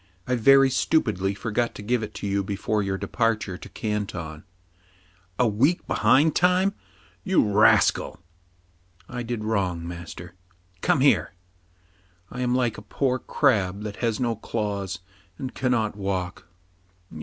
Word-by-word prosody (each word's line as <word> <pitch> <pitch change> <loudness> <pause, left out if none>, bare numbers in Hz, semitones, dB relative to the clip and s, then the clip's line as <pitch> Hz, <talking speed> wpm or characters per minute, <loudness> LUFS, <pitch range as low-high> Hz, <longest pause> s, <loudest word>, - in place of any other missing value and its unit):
" 90 - -37
I 125 - 0
very 135 +3 +5
stupidly 100 - +1
forgot 115 +3 -2
to 105 - -8
give 120 +2 0
it 110 - -6
to - - -6
you 100 0 0
before 105 +2 -1
your 95 -1 -2
departure 105 -1 -1
to 90 - -11
Canton. 90 -7 -4 0.5
" 90 0 -34
A 125 - +3
week 130 +12 +1
behind 145 +4 +3
time, 180 +2 +3 0.5
you 190 - +3
rascal! 105 +1 +3 0.5
" 85 0 -38
I 125 - -5
did 120 -2 -4
wrong, 95 -6 -1
master. 85 0 -8 0.2
" 90 0 -36
Come 135 - +2
here. 135 -7 +3 0.5
" 90 0 -35
I 125 - -5
am 125 0 +1
like 120 -5 0
a - - -11
poor 130 +5 -1
crab 105 -10 +1
that 105 -1 -6
has 115 -3 -1
no 120 -2 0
claws, 100 -4 -3 0.4
and 130 - -5
cannot 120 -5 0
walk. 95 -4 -4
105 Hz, 155 wpm, -25 LUFS, 90-125 Hz, 0.5 s, very